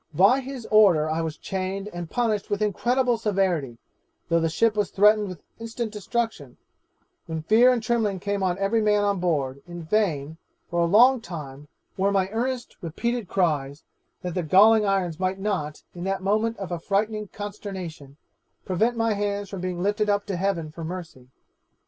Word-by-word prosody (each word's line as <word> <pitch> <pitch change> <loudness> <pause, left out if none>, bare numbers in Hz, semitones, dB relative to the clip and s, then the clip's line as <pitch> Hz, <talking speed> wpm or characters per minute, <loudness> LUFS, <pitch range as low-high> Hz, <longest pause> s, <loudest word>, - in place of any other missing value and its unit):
'By 200 - +5
his 265 -3 -7
order 190 -8 +5
I 160 +1 -1
was 160 -2 -4
chained 190 +1 -4
and 175 -3 -7
punished 220 -4 -1
with 205 0 0
incredible 240 +4 +1
severity, 185 - 0 0.5
though 170 0 +3
the 165 0 +1
ship 220 +6 +2
was 210 -2 0
threatened 210 +1 +4
with 180 -4 -9 0.2
instant 230 0 -4
destruction: 210 - -3 0.7
when 160 -1 -4
fear 230 +8 +5
and 240 -3 0
trembling 215 -5 0
came 200 +1 -2
on 185 -1 0
every 200 +3 +1
man 210 -1 +3
on 200 -2 +1
board, 140 -6 -1
in 175 -1 -8
vain, 160 -5 0 0.3
for 170 - 0
a 170 - +4
long 240 +8 +5
time, 150 -6 -8 0.3
were 195 +1 +2
my 190 -1 +1
earnest 245 +2 -3
repeated 230 +6 -3
cries, 150 -6 -1 0.4
that 180 -1 -3
the 180 - -1
galling 210 +6 +5
irons 185 -4 0
might 185 0 0
not, 190 -7 -3
in 175 - -7
that 195 0 -2
moment 215 +3 +1
of 195 -3 -6
affrighting 210 +5 -1
consternation, 190 -9 -7 0.5
prevent 225 +6 +1
my 225 -1 +2
hands 205 -1 -2
from 195 -3 -6
being 180 -1 -3
lifted 210 +1 +1
up 205 0 +1
to 195 - -3
heaven 175 -4 -1
for 165 +1 -8
mercy. 165 -7 -7
195 Hz, 175 wpm, -25 LUFS, 170-215 Hz, 0.7 s, By